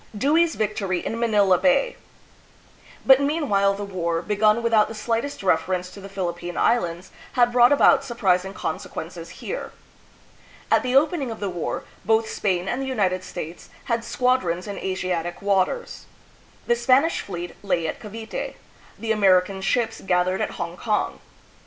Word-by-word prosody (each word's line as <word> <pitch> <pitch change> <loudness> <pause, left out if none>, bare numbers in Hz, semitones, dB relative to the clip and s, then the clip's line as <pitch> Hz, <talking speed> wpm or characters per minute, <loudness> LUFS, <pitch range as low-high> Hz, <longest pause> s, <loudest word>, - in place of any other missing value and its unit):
Dewey's 320 +8 +3
Yictory 200 -4 -1
in 230 - -3
Manila 205 -6 +3
Bay. 480 - +2 1.1
But 265 0 +7
meanwhile 275 -10 +1
the 205 - -5
war, 170 -4 -2
begun 215 +2 +2
without 225 -2 +4
the 225 - -8
slightest 230 +4 -2
reference 180 +1 0
to 200 - -11
the 195 - -9
Philippine 175 -2 -4
Islands, 175 -6 0 0.2
had 245 -1 +3
brought 245 +1 +6
about 285 - +5
surprising 195 -6 0
conse - - -4
quences - - -7
here. - - -6 1.0
At - - +5
the 255 0 -1
opening 290 -1 +3
of 225 - -6
the 200 -2 -2
war, 175 -3 -3 0.2
both 220 0 +2
Spain 185 -4 -1
and 245 +6 -1
the 270 - -3
United 185 -8 0
States 165 -1 -8
had 235 -1 -1
squadrons 235 -8 0
in 205 -1 -6
Asiatic 180 -2 -3
waters. 200 - -1 0.6
The 240 - +3
Spanish 260 +7 +3
fleet 175 -2 -6
lay 180 -5 0
at - - -4
Cavite, 220 +1 -6 0.4
the 225 -1 -2
American 190 -2 +3
ships 225 +3 0
gathered 185 0 +1
at - - -3
Hong 170 +1 -5
kong. 215 0 -1
205 Hz, 150 wpm, -23 LUFS, 185-240 Hz, 1.1 s, But